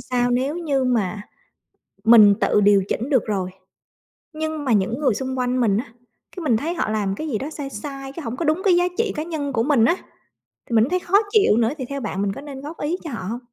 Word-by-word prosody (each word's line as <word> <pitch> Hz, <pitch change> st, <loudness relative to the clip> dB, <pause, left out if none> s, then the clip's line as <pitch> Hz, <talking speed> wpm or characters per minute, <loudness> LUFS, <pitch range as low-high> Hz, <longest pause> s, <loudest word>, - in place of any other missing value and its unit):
sao 245 Hz, -1 st, 0 dB
nếu 265 Hz, +6 st, 0 dB
như 285 Hz, -6 st, 0 dB
mà 215 Hz, -5 st, 0 dB, 0.8 s
mình 215 Hz, -3 st, +8 dB
tự 210 Hz, -, +3 dB
điều 200 Hz, -1 st, +5 dB
chỉnh 250 Hz, +7 st, -2 dB
được 260 Hz, -4 st, +3 dB
rồi, 190 Hz, -3 st, -2 dB, 0.8 s
nhưng 315 Hz, -1 st, -4 dB
mà 240 Hz, -, +2 dB
những 215 Hz, +6 st, +1 dB
người 265 Hz, -7 st, +2 dB
xung 260 Hz, +3 st, -4 dB
quanh 250 Hz, 0 st, 0 dB
mình 205 Hz, -3 st, +2 dB
á, 245 Hz, -, -2 dB, 0.5 s
cái 365 Hz, -, -6 dB
mình 240 Hz, -7 st, +2 dB
thấy 325 Hz, +8 st, -2 dB
họ 270 Hz, -, -1 dB
làm 205 Hz, -3 st, -1 dB
cái 310 Hz, -, -5 dB
gì 220 Hz, -, -1 dB
đó 280 Hz, +6 st, -5 dB
sai 285 Hz, -3 st, -6 dB
sai, 275 Hz, +3 st, -7 dB
cái 335 Hz, -, -7 dB
hổng 230 Hz, +2 st, -4 dB
có 330 Hz, -, -2 dB
đúng 315 Hz, +5 st, +1 dB
cái 365 Hz, -, +5 dB
giá 355 Hz, -, +3 dB
trị 460 Hz, -2 st, +1 dB
cá 305 Hz, -, -2 dB
nhân 295 Hz, -5 st, -4 dB
của 225 Hz, -1 st, +1 dB
mình 270 Hz, -6 st, +3 dB
á, 345 Hz, -, +3 dB, 0.7 s
thì 235 Hz, -, -7 dB
mình 220 Hz, -, +6 dB
cũng 260 Hz, -, -1 dB
thấy 365 Hz, 0 st, +1 dB
khó 370 Hz, +3 st, +3 dB
chịu 405 Hz, -, +4 dB
nữa 230 Hz, -1 st, +3 dB
thì 260 Hz, -, -4 dB
theo 280 Hz, -1 st, -4 dB
bạn 195 Hz, -3 st, -3 dB
mình 200 Hz, -1 st, -1 dB
có 275 Hz, -, -8 dB
nên 275 Hz, -2 st, -8 dB
góp 305 Hz, +4 st, -8 dB
ý 320 Hz, +5 st, -1 dB
cho 320 Hz, -, -6 dB
họ 230 Hz, -, -5 dB
hông? 235 Hz, +2 st, -4 dB
260 Hz, 255 wpm, -22 LUFS, 220-305 Hz, 0.8 s, mình